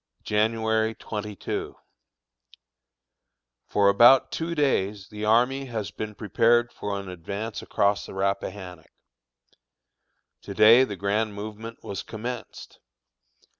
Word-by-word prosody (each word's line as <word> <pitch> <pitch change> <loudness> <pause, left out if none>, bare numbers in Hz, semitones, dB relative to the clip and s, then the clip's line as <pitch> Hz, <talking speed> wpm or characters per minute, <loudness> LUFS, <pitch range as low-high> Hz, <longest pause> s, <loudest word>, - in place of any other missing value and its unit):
January 110 +1 +1
22. 105 -2 -5 1.9
For 100 -1 +2
about 120 +6 +6
two 170 +1 -3
days 105 -9 0
the 105 0 -5
army 125 +5 +2
has 110 -5 -5
been 105 -1 -6
prepared 120 +2 +2
for 100 -1 -4
an 100 - -8
advance 100 +5 -6
across 100 0 0
the - - -10
Rappahannock. 95 -3 -3 1.5
To - - -8
day 115 +4 +7
the 105 - -6
grand 100 +3 -1
movement 110 +2 -8
was 100 - -5
commenced. 115 +1 -8
105 Hz, 105 wpm, -25 LUFS, 100-115 Hz, 1.9 s, day